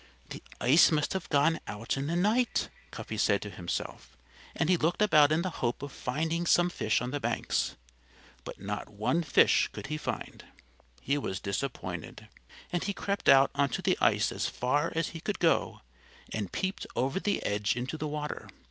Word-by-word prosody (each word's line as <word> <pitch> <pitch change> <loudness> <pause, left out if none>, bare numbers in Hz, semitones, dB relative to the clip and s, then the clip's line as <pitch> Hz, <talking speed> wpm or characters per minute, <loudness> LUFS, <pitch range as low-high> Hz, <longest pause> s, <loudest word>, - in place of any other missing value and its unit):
"The - - -7 0.2
ice 140 +9 +6
must 150 -2 +1
have 190 -3 -4
gone 150 +3 +3
out 105 +2 -3
in 135 +1 -3
the 165 - -1
night," 215 +7 +1 0.2
Cuffy - - -6
said - - +3
to - - -7
himself. - - -5 0.4
And 160 - 0
he 180 - +5
looked 165 +1 0
about 155 -8 +5
in 160 +2 +2
the 185 - -2
hope 120 +2 -1
of 145 - -6
finding 160 +8 -2
some 175 +1 +4
fish 110 -6 0
on 125 - -3
the 145 - -2
banks. 120 -2 -1 0.7
But - - -8
not 105 +2 -5
one 110 +11 0
fish 150 -5 +4
could - - -8
he - - -1
find. - - -5 0.6
He 140 +2 0
was 95 -8 -3
disappointed. 100 - -5 0.4
And 175 - 0
he 200 - -2
crept 200 +1 -1
out 135 0 +7
onto 140 -2 0
the - - +3
ice - - +3
as - - -2
far 145 +6 0
as 165 -1 0
he 165 - -8
could 205 +1 -2
go 165 -2 +1 0.5
and 105 -4 -3
peeped 190 +1 -3
over 135 +9 0
the 205 0 -1
edge 105 +1 0
into 125 +5 -3
the 155 -1 -3
water. 150 0 -5
150 Hz, 185 wpm, -29 LUFS, 125-170 Hz, 0.7 s, out